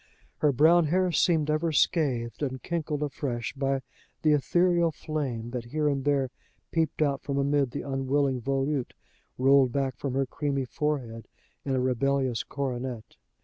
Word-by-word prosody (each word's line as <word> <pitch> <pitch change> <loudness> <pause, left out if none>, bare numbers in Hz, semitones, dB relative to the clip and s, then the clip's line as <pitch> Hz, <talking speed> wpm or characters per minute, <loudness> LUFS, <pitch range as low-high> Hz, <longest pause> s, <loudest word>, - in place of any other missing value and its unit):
Her 150 - +4
brown 160 +6 +5
hair 180 +4 +2
seemed 155 -1 +2
ever 155 +2 +1
scathed 135 -7 +1
and 130 -3 -3
crinkled 155 -3 -2
afresh 130 -5 -3
by 135 -1 -1 0.4
the 155 - +4
ethereal 170 +3 +3
flame 135 -7 -4
that 120 -2 -4
here 150 +5 -1
and 140 -2 0
there 140 -3 +1 0.4
peeped 160 -2 +1 0.2
from 140 -1 -3
amid 140 -1 +2
the 135 - -5
unwilling 135 -1 0
volute 135 +1 -1 0.4
rolled 135 0 +5
back 135 0 -1
from 135 -2 -3
her 135 0 +2
creamy 140 0 -2
forehead 125 -5 -3 0.4
in 135 -2 -1
a - - +1
rebellious 130 -1 +1
coronet. 125 -4 -5
140 Hz, 145 wpm, -27 LUFS, 130-150 Hz, 0.4 s, brown